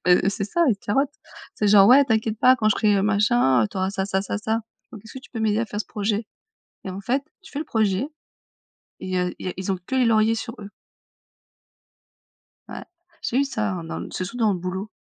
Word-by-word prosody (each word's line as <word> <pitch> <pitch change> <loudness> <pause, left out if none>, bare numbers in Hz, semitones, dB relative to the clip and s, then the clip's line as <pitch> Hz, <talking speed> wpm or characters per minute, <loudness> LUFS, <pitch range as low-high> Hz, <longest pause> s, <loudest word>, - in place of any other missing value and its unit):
Beh 180 +2 +4
c'est 200 - -3
ça, 340 - +1
ils 215 - +2
te - - -26
carottent. 270 +7 +1 0.4
C'est 210 - 0
genre: 200 -1 +7
«Ouais, 275 +3 +7
t'inquiète 220 -2 0
pas, 255 +2 +6
quand 215 -2 +1
je - - +2
serai 205 -3 +2
machin, 205 - +3
heu, - - -3
t'auras 190 0 -2
ça 190 -1 -2
ça 190 -1 0
ça 205 - -3
ça. 220 +2 -1 0.3
Donc 215 -3 -10
est-ce 220 - -13
que - - -6
tu - - -17
peux 225 - -5
m'aider 215 0 +1
à 230 - -1
faire 210 0 -4
ce - - -5
projet?» 210 +1 -2 0.6
Et 190 - -5
en 190 +2 -6
fait, 265 +6 0 0.2
tu - - -15
fais 285 - -4
le 315 - -4
projet 215 +3 0 1.0
et - - -5
il - - -5
y 185 - 0
a 180 0 0
il - - -7
y - - 0
a - - -6
ils 190 +1 -2
ont 185 - -3
que - - -4
les 260 -1 +3
lauriers 220 0 +3
sur 230 +1 -5
eux. 200 0 -9 2.0
Ouais, - - -8 0.4
j'ai 245 - 0
eu 280 - +3
ça, 220 -7 -2
hein, 175 -3 -5
dans 165 - -5
l - - -7
surtout 185 +6 -5
dans 220 -4 +2
le 180 - -3
boulot. 185 +3 -4
210 Hz, 250 wpm, -23 LUFS, 195-230 Hz, 2.0 s, genre